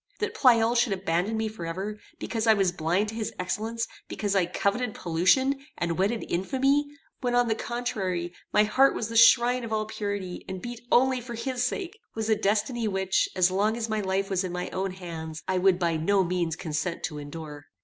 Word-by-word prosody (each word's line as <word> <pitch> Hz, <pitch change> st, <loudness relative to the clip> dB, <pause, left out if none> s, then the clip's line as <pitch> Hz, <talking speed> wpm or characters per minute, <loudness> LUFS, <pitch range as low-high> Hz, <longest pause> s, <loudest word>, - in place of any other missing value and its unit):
That 435 Hz, 0 st, -2 dB
Pleyel 235 Hz, -, +4 dB
should 235 Hz, -3 st, +3 dB
abandon 190 Hz, +3 st, -1 dB
me 220 Hz, 0 st, 0 dB
forever, 200 Hz, +1 st, -5 dB, 0.2 s
because 225 Hz, -1 st, -3 dB
I 220 Hz, -, +7 dB
was 195 Hz, -3 st, +2 dB
blind 180 Hz, +5 st, 0 dB
to -, -, -6 dB
his 220 Hz, -2 st, -3 dB
excellence, 220 Hz, +5 st, -2 dB, 0.2 s
because 205 Hz, -2 st, -2 dB
I 185 Hz, -3 st, +3 dB
coveted 205 Hz, +6 st, -1 dB
pollution, 260 Hz, +12 st, +2 dB
and 170 Hz, -1 st, -1 dB
wedded 210 Hz, +4 st, 0 dB
infamy, 270 Hz, +10 st, +1 dB, 0.3 s
when, 245 Hz, -2 st, 0 dB
on 245 Hz, -1 st, +4 dB
the 225 Hz, -, +2 dB
contrary, 195 Hz, -8 st, -3 dB, 0.2 s
my 210 Hz, -, +5 dB
heart 265 Hz, +6 st, +4 dB
was 225 Hz, -, -3 dB
the 230 Hz, -, -6 dB
shrine 240 Hz, +2 st, +6 dB
of 230 Hz, -, -6 dB
all 215 Hz, -1 st, 0 dB
purity, 205 Hz, -4 st, -4 dB
and 190 Hz, 0 st, -4 dB
beat 240 Hz, +3 st, -7 dB
only 260 Hz, 0 st, +4 dB
for 240 Hz, 0 st, -7 dB
his 250 Hz, +1 st, -3 dB
sake, 370 Hz, -, -3 dB, 0.2 s
was 220 Hz, 0 st, -2 dB
a -, -, +5 dB
destiny 215 Hz, +3 st, 0 dB
which, 190 Hz, -1 st, +1 dB
as 185 Hz, 0 st, +4 dB
long 210 Hz, +4 st, +1 dB
as 230 Hz, -1 st, -3 dB
my 215 Hz, -1 st, 0 dB
life 195 Hz, 0 st, 0 dB
was 190 Hz, 0 st, +1 dB
in 185 Hz, -, -3 dB
my 180 Hz, 0 st, -4 dB
own 190 Hz, +1 st, -1 dB
hands, 160 Hz, -4 st, -7 dB
I 185 Hz, -1 st, +1 dB
would 185 Hz, -1 st, +4 dB
by 170 Hz, -3 st, 0 dB
no 195 Hz, +5 st, +2 dB
means 170 Hz, -2 st, -1 dB
consent 170 Hz, +1 st, -3 dB
to 150 Hz, -3 st, -3 dB
endure. 145 Hz, 0 st, -8 dB
205 Hz, 200 wpm, -27 LUFS, 180-235 Hz, 0.3 s, I